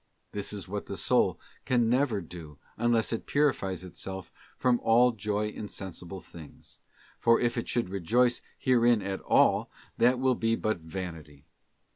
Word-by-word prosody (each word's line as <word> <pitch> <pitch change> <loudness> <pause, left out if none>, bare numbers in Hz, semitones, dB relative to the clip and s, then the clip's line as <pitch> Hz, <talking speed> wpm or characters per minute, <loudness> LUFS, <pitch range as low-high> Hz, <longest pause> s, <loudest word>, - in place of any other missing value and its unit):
This 100 -1 -3
is 100 -4 -5
what 100 +2 -5
the - - -5
soul - - +2 0.2
can 120 -2 +2
never 120 -3 +2
do 80 -3 -10 0.2
unless 120 -1 +1
it 115 - -4
purifies 110 - +1
itself 95 0 -7 0.3
from 125 -2 +2
all 120 +2 +5
joy 105 -1 -2
in 105 0 -7
sensible 95 -1 -7
things, 80 -3 -13 0.4
for 115 0 +4
if 120 -1 +1
it 115 - -3
should 120 -6 -1
rejoice 115 +7 +2 0.2
herein 120 -4 +3
at 95 0 -3
all - - +3 0.3
that 125 +2 +4
will 130 0 +2
be 115 -1 +1
but 110 -4 -1
vanity. 80 -4 -8
105 Hz, 155 wpm, -29 LUFS, 95-120 Hz, 0.4 s, all